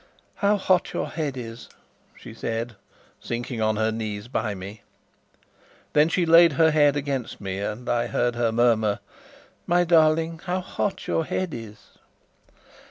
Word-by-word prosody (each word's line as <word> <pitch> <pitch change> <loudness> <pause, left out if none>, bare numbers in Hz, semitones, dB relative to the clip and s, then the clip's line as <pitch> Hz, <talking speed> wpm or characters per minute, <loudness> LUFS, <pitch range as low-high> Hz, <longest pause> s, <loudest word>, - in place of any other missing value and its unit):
"How 205 +1 +2
hot 185 -2 +1
your - - -2
head 150 -5 -3
is," 115 -1 -8 0.5
she - - -11
said, 115 +1 -4 0.4
sinking 120 0 -4
on 110 0 +2
her 110 +1 +1
knees 110 -1 -4
by 110 -4 -2
me. 100 +3 -9 1.1
Then 150 +2 +4
she 175 +1 +1
laid 165 -1 +7
her 160 +3 +4
head 145 -2 +4
against 140 -4 -3
me, 95 -1 -4
and 105 +4 -4
I 120 -1 +1
heard 120 0 0
her 120 -1 0
murmur: 110 -3 +2 0.7
"My 175 +1 +3
darling, 165 -1 +3
how 180 0 -1
hot 190 +1 -3
your 165 - 0
head 180 +1 -3
is!" 110 -2 -11
120 Hz, 150 wpm, -24 LUFS, 110-165 Hz, 1.1 s, laid